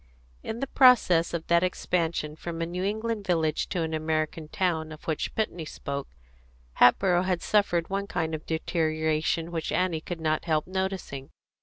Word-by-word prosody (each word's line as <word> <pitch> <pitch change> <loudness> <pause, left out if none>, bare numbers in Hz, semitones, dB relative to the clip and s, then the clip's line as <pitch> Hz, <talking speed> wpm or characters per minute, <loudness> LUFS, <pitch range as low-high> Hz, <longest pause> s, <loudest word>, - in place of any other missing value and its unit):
In 225 - -5
the - - +1
process 245 -12 +5
of 170 -1 -3
that 170 0 +4
expansion 165 -4 -1
from 165 +1 -6
a 165 - 0
New 180 +2 -4
England 220 +2 -2
village 165 -5 0
to 175 - -1
an 160 0 -3
American 155 +1 -1
town 160 -2 -1
of 155 - -10
which 160 -2 -2
Putney 180 -6 -1
spoke, 140 -2 -5 0.7
Hatboro' 175 +7 +5
had 185 -2 -1
suffered 190 -5 +1
one 200 0 -1
kind 160 -4 -2
of 155 0 -5
deterioration 160 0 0
which 165 -2 -3
Annie 180 -3 0
could 175 0 -6
not 155 0 0
help 155 -2 +1
noticing. 190 -8 -4
165 Hz, 165 wpm, -27 LUFS, 160-185 Hz, 0.7 s, process